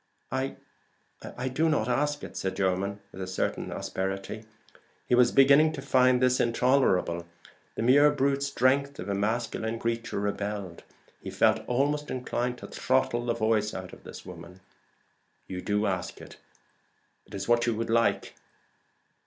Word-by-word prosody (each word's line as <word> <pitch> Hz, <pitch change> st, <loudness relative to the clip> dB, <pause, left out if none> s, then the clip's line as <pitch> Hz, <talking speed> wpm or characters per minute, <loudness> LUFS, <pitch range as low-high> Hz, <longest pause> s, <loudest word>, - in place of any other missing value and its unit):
"I 130 Hz, +1 st, -2 dB, 1.0 s
do 160 Hz, +4 st, +2 dB
not 145 Hz, -8 st, +1 dB
ask 145 Hz, +4 st, 0 dB
it," -, -, -8 dB
said 95 Hz, 0 st, -3 dB
Jermyn, 100 Hz, +1 st, -1 dB
with 95 Hz, -, -9 dB
a 95 Hz, -, -4 dB
certain 95 Hz, -, -2 dB
asperity. 95 Hz, +3 st, -4 dB, 0.6 s
He -, -, -1 dB
was 120 Hz, 0 st, +5 dB
beginning 140 Hz, +3 st, +6 dB
to 140 Hz, -, -6 dB
find 130 Hz, -2 st, +4 dB
this 125 Hz, 0 st, +3 dB
intolerable. 115 Hz, -9 st, +2 dB, 0.5 s
The -, -, -2 dB
mere 140 Hz, +5 st, +6 dB
brute 140 Hz, -1 st, +1 dB
strength 140 Hz, +1 st, +1 dB
of 95 Hz, -, -6 dB
a -, -, 0 dB
masculine 110 Hz, +2 st, -1 dB
creature 115 Hz, -1 st, -2 dB
rebelled. 100 Hz, -3 st, -3 dB, 0.4 s
He -, -, -6 dB
felt -, -, +3 dB
almost 145 Hz, +4 st, 0 dB
inclined 125 Hz, -1 st, -2 dB
to -, -, -9 dB
throttle 120 Hz, -2 st, 0 dB
the 120 Hz, -, +1 dB
voice 110 Hz, -2 st, +1 dB
out 95 Hz, -1 st, -7 dB
of -, -, -13 dB
this -, -, -10 dB
woman. 90 Hz, +2 st, -11 dB, 0.8 s
"You 90 Hz, -1 st, -6 dB
do 105 Hz, +2 st, 0 dB
ask 95 Hz, -3 st, -3 dB
it: -, -, -12 dB, 0.9 s
it -, -, -10 dB
is 95 Hz, -, -4 dB
what 120 Hz, 0 st, +3 dB
you 115 Hz, -, +1 dB
would 115 Hz, +1 st, -3 dB
like. 115 Hz, 0 st, +1 dB
120 Hz, 155 wpm, -28 LUFS, 100-130 Hz, 1.0 s, beginning